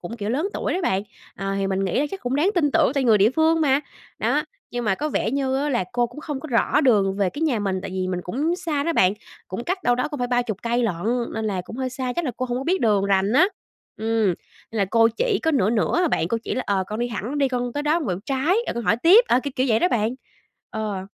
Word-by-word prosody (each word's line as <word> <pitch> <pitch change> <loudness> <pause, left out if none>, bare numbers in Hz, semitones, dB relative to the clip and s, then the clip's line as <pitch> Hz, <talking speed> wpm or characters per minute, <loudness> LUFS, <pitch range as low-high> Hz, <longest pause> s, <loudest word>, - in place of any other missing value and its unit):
cũng, 225 +7 -7
kiểu, 210 0 -3
lớn 310 +10 0
tuổi - - -1
đó 370 - -1
bạn, 195 - +1 0.3
ờ, 195 0 -3
thì 195 - 0
mình 195 0 -1
nghĩ 190 +7 0
là 295 - +1
chắc 390 - -6
cũng 250 +2 -1
đáng 325 +7 +3
tin 295 -4 +3
tưởng 320 -6 +3
tại 275 - +1
người 225 -3 +5
địa 205 +4 +5
phương 320 +3 +2
mà, 280 -2 +3 0.4
đó. - - +1 0.3
Nhưng 245 0 -3
mà 210 -3 +2
có 300 - -3
vẻ 230 - -1
như 270 -1 0
á 290 +2 0
là 240 -9 0
cô 240 0 +1
cũng 295 - -11
không 295 -4 -5
có 315 - -8
rõ 245 +5 +2
đường 205 -8 +3
về 195 -3 +1
cái 290 - -5
nhà 280 -9 +1
mình, 195 -2 -1
tại - - -6
vì 185 0 -2
mình 180 -1 -2
cũng 295 - -1
xa 320 -6 -2
đó 335 - +1
bạn, 185 - +4 0.4
cũng 190 +6 -5
cách 370 +1 -2
đâu 245 - +3
đó 250 +4 -1
cũng 295 -3 -6
phải 245 - -1
30 240 -5 0
cây 235 +1 0
lận, 220 -7 0 0.4
nên 220 0 -3
là 195 -3 -1
cũng 225 - -9
hơi 260 -1 -2
xa, 255 -1 -3
chắc 345 - 0
là 270 - -1
cô 255 - -2
hổng 245 0 -2
có 265 - -5
biết 370 +5 +1
đường 210 -5 +2
rành 195 +1 +2
á. 300 +9 +6 0.5
Ừm, 220 -4 +1 0.4
là 215 -3 0
cô 230 0 +5
chỉ 465 -5 +1
có 320 - +2
nửa 215 -9 +2
nửa 240 +10 +1
à - - +2
bạn, 165 - 0
cô 230 - 0
chỉ - - -2
là 255 - -1
"Ờ, 195 -2 +1
con 215 - -5
đi 240 - 0
thẳng 235 +5 -4
đi, 275 -1 +3
con 245 -1 -2
tới 290 - -1
đó 300 +3 +2
con 315 - -4
quẹo 180 -1 -1
trái, 275 +7 +1
rồi - - -2
con 235 -1 -4
hỏi - - +3
tiếp", 365 - +6
ờ, 250 - +4
kiểu 285 - -3
kiểu 255 - +2
vậy 220 - +4
đó 360 - +2
bạn, 225 +1 0 0.6
ờ. 210 -4 -4
245 Hz, 290 wpm, -23 LUFS, 210-290 Hz, 0.6 s, á